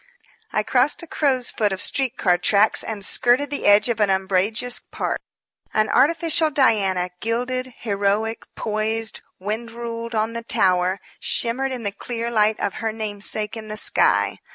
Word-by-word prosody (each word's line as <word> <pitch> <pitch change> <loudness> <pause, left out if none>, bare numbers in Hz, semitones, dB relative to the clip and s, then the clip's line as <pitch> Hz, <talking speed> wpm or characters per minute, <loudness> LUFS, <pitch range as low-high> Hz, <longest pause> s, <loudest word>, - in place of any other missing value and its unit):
I - - 0
crossed - - +2
a - - -6
crow's 270 -6 0
foot 210 -2 0
of 190 - -3
street 265 +3 +1
car 180 -3 +3
tracks, 205 +3 +3
and 210 -3 -4
skirted 255 +4 +2
the 285 - -1
edge 205 +2 +6
of 235 -2 -1
an 210 -2 +3
umbrageous 195 +6 +1
park. - - -4 0.6
An 215 0 +2
artificial 325 +1 +3
Diana, 200 - +2
gilded, 250 +3 -2
heroic, 205 +1 -1
poised, 220 +1 -2 0.2
wind 220 +4 -4
ruled, 230 0 -6
on 220 +1 0
the 235 - -4
tower, 185 -3 +2 0.2
shimmered 260 +3 -1
in 250 -3 -5
the 200 - -1
clear 235 +3 -4
light 215 -1 +2
of 200 - -1
her 225 -1 -1
namesake 215 0 -3
in 220 -1 -8
the 215 0 -6
sky. 100 - +2
220 Hz, 160 wpm, -22 LUFS, 205-240 Hz, 0.6 s, edge